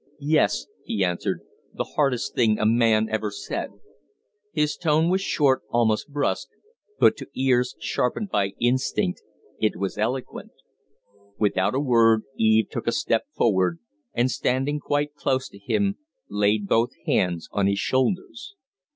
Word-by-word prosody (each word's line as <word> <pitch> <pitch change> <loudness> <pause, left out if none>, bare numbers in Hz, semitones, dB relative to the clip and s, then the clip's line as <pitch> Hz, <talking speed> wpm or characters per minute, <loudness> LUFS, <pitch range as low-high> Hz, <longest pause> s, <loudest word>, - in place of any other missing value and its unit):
"Yes," 145 - +2 0.2
he 100 -3 0
answered, 90 -1 -2 0.3
"the - - -1
hardest 140 -2 +1
thing 110 -3 +3
a - - 0
man 110 -1 +3
ever 110 -1 -1
said 100 - -5 0.5
" - - -50 0.3
His 150 -4 0
tone 160 0 +2
was 190 +1 +2
short, 140 -8 +2
almost 115 +1 +1
brusque, 135 -3 -1 0.5
but - - +5
to - - -8
ears 125 -1 +1
sharpened 125 - -1
by 100 -1 0
instinct 120 -6 0 0.4
it 110 -1 +1
was 100 +1 -4
eloquent. 125 +4 -3 0.8
Without 100 0 +1
a - - +2
word 115 -5 +4
Eve 110 0 +3
took - - -5
a - - +3
step - - 0
forward, 100 - +2 0.4
and, 125 +2 +2
standing 135 +4 0
quite 145 0 -1
close 130 -2 -1
to 100 - -15
him, 195 - 0 0.3
laid 105 0 +1
both 115 +3 +3 0.2
hands 85 -3 0
on 100 -1 +1
his 100 0 +1
shoulders. 185 - -1
120 Hz, 145 wpm, -24 LUFS, 105-140 Hz, 0.8 s, but